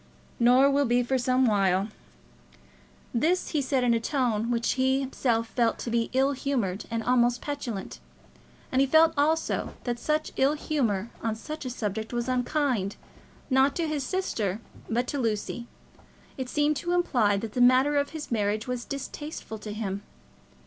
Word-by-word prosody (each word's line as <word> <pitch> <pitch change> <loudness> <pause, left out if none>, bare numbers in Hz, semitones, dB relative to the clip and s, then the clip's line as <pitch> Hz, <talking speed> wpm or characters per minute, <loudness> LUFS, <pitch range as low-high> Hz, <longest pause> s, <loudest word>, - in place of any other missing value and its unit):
"Nor 250 +3 +6
will 280 0 +3
be, 245 0 +2
for 260 +2 0
some 255 +1 +2
while." 195 -2 +2 1.2
This 330 +10 +1
he 300 - 0
said 265 -1 0
in 240 -1 +3
a 230 - +2
tone 230 -3 0
which 235 -1 +1
he 265 0 +2
himself 235 -4 0
felt 235 -2 +1
to 235 - -5
be 230 0 +1
ill 265 +2 +3
humoured 255 -9 -2
and 230 -1 -2
almost 245 0 +3
petulant. 255 -9 -5 0.7
And 260 - +3
he 275 - +3
felt 320 +3 +5
also 310 +3 0
that 240 -1 -2
such 305 +4 -1
ill 275 +2 +4
humour 235 -9 -1
on 225 -1 -1
such 300 +6 -7
a - - -2
subject 220 -2 -4
was 240 0 -1
unkind, 250 -5 0 0.6
not 265 +1 +4
to 335 -2 0
his 300 -3 -2
sister, 225 - -2 0.3
but 240 +2 +1
to 285 +2 -3
Lucy. 230 0 -2 0.7
It 260 -2 -5
seemed 295 +1 +1
to 345 +5 -2
imply 245 - +2
that 215 +1 -5
the 250 - 0
matter 255 +4 +5
of 285 0 +1
his 310 -3 -7
marriage 215 -1 0
was 250 -1 -3
distasteful 280 -4 -6
to 210 - -7
him. 200 -2 -3
250 Hz, 170 wpm, -27 LUFS, 225-280 Hz, 1.2 s, Nor